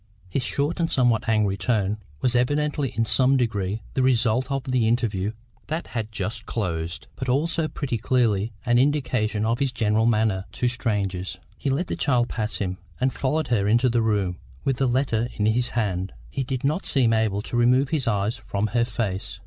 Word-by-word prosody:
His 110 +9 -1
short 140 - -1
and 165 -1 +1
somewhat 120 -4 +2
angry 105 -3 +2
tone 105 +1 0 0.2
was 125 -1 +2
evidently 145 +2 +1
in 115 0 +1
some 130 +4 +4
degree 105 -3 -1
the 130 - +1
result 125 0 +2
of 135 -1 -1
the 125 -3 +1
interview 110 -4 0 0.3
that 160 +2 -2
had 110 -3 -3
just 105 +2 -4
closed, 85 -5 -3
but 130 - -4
also 155 +4 +1
pretty 135 -6 -3
clearly 115 -3 +1
an 120 0 +4
indication 125 -6 +1
of 115 +2 +1
his 140 -2 +1
general 110 -1 +2
manner 110 -4 +2
to 125 - 0
strangers. 100 -7 -1 0.2
He 140 - -3
let 140 +7 0
the - - -3
child 125 -4 +2
pass 110 -1 -2
him, 95 -2 -3 0.2
and 130 0 +1
followed 150 +1 -1
her 105 -5 +2
into 120 +4 +4
the 120 0 +2
room 100 -5 0 0.2
with 135 -2 0
the 135 - +2
letter 120 -2 +1
in 105 - 0
his 120 +3 +2
hand. 95 -4 -1 0.2
He 135 - -2
did 130 -1 -3
not 150 +7 0
seem 120 -5 +3
able 110 -2 +1
to - - -5
remove 125 +3 +4
his 155 -6 -1
eyes 105 +1 +1
from 100 -2 -3
her 120 -1 +3
face. 100 -5 -3
115 Hz, 190 wpm, -24 LUFS, 105-130 Hz, 0.3 s, some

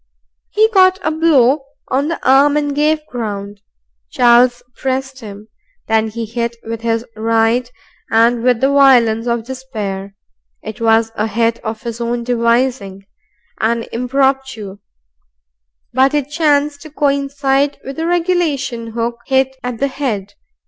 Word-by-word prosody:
He 435 +1 +3
caught 375 -3 +4
a 315 - 0
blow 295 -4 +3 0.3
on 275 +3 0
the 335 - -3
arm 280 +3 +5
and 290 -1 -1
gave 305 +1 +1
ground. 205 -5 -6 0.5
Charles 245 0 +4
pressed 265 0 -3
him. 210 -2 -10 0.4
Then 220 0 +2
he 225 +1 -5
hit 235 +1 -3
with 225 0 -5
his 230 0 -1
right 225 +2 +1 0.4
and 230 +1 +3
with 245 -1 +2
the 270 - +3
violence 245 -5 +4
of 235 -1 -1
despair. 210 -7 -6 0.5
It 215 +2 -8
was 225 0 +3
a 215 0 -1
hit 230 +2 0
of 220 0 -5
his 235 0 -5
own 235 0 -2
devising, 235 -4 0 0.5
an 230 +1 0
impromptu, 255 -5 -1 1.1
but 265 +3 +3
it 290 -1 -1
chanced 295 -2 +1
to 310 - -10
coincide 280 -1 0
with 270 +1 -7
the 325 +1 -2
regulation 320 -10 -1
hook 235 +1 -2
hit 265 0 +1
at 245 -1 -4
the 275 - 0
head. 220 -8 -4
245 Hz, 140 wpm, -16 LUFS, 225-275 Hz, 1.1 s, arm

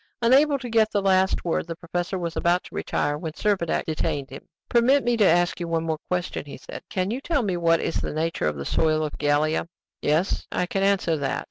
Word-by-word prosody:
Unable 280 +5 +5
to 260 -2 -7
get 220 -2 +3
the 205 - 0
last 190 -1 +2
word, 170 0 -1
the 165 - -5
professor 175 +2 -3
was 170 -2 -4
about 175 +1 +2
to - - -14
retire, 145 0 -1
when 160 -1 -5
Servadac 190 -3 0
detained 145 -3 -2
him. 135 - -10 0.2
"Permit 255 +4 +4
me 240 0 +2
to 215 - +4
ask 175 -1 +3
you 170 - -3
one 165 -1 0
more 160 -2 -2
question," 180 -1 -2
he 140 - -8
said. - - -9
"Can 185 +1 -1
you 250 +4 -3
tell 285 -4 0
me 190 -4 -1
what 165 -1 +3
is - - -2
the - - -3
nature 160 - -1
of 75 - -1
the 70 -1 -6
soil 155 - +1
of 150 - -4
Gallia?" 150 +2 +1 0.3
"Yes, 155 +6 0
I 180 - 0
can 195 +2 -2
answer 195 -5 +2
that. 140 -2 -1
175 Hz, 230 wpm, -24 LUFS, 160-200 Hz, 0.3 s, Unable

